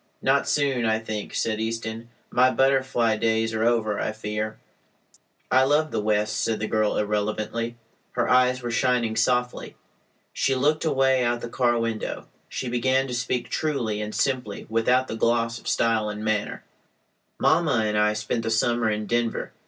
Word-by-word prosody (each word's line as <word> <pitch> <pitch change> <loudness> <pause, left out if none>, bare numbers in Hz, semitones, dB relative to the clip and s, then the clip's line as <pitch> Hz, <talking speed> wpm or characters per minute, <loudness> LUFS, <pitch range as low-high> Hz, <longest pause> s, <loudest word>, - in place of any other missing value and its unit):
"Not - - +2
soon, 140 -4 +1
I 110 -1 +2
think," 110 -1 -5
said 110 -1 -1
Easton. 115 0 -4 0.2
"My 125 +1 +4
butterfly 130 -4 +2
days 110 0 +1
are 110 0 0
over, 115 -3 +1
I - - -1
fear." 110 0 -4 0.9
"I 130 +1 +5
love 150 +3 +2
the - - -1
West," 105 0 0
said 110 -1 -1
the 110 - -2
girl 110 -1 0
irrelevantly. 110 +3 -2 0.4
Her - - 0
eyes 125 0 +3
were 120 - -3
shining 120 -2 +1
softly. 125 0 0 0.6
She 135 - +1
looked 150 +5 +1
away 135 -3 +2
out 120 0 0
the 120 - -5
car 120 -1 +1
window. 115 -1 -3 0.2
She 130 - -4
began 130 +2 +1
to - - -4
speak 120 0 -2
truly 120 -9 -1
and 105 0 -5
simply 125 -7 -1
without 125 +3 +2
the - - -4
gloss 115 0 +1
of - - -13
style 115 -2 +1
and 105 +1 -5
manner: 110 -1 -1 0.7
"Mamma 155 -8 +2
and 105 0 -1
I 105 0 +3
spent 105 +2 -2
the 115 - -3
summer 115 0 +1
in 105 0 -2
Denver. 120 +1 -1
115 Hz, 170 wpm, -25 LUFS, 110-125 Hz, 0.9 s, I